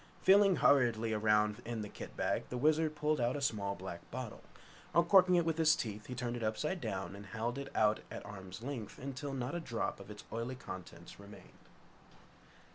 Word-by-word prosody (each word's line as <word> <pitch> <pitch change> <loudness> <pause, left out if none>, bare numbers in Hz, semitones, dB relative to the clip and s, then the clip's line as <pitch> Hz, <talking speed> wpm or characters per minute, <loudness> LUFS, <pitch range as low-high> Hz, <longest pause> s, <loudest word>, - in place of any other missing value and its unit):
Feeling 195 0 +6
hurriedly 115 -7 +3
around 105 +1 +2
in 115 -2 -4
the - - -5
kit - - -9
bag, - - 0
the 125 - -3
Wizard 155 +3 +2
pulled 150 -1 +1
out 120 +3 +1
a - - -2
small, 105 -7 -1
black 90 -2 -8
bottle. - - -6 0.5
Uncorking 180 +2 +6
it 170 -2 +3
with 165 -1 0
his 155 -1 +6
teeth, 105 -2 -5
he 125 - -5
turned 120 -1 -2
it 120 - -5
upside 150 - -1
down 95 -3 -3
and 100 0 -10
held 115 +5 -3
it 140 - -6
out 110 0 +3
at - - -7
arm's 95 +1 -9
length 120 -6 -5
until 140 +1 -5
not 130 +2 -3
a 175 - -1
drop 115 -11 -3
of 100 - -11
its 105 0 -9
oily 115 +3 -3
contents 95 -9 -9
remained. 100 +1 -14
120 Hz, 195 wpm, -34 LUFS, 105-145 Hz, 0.5 s, Feeling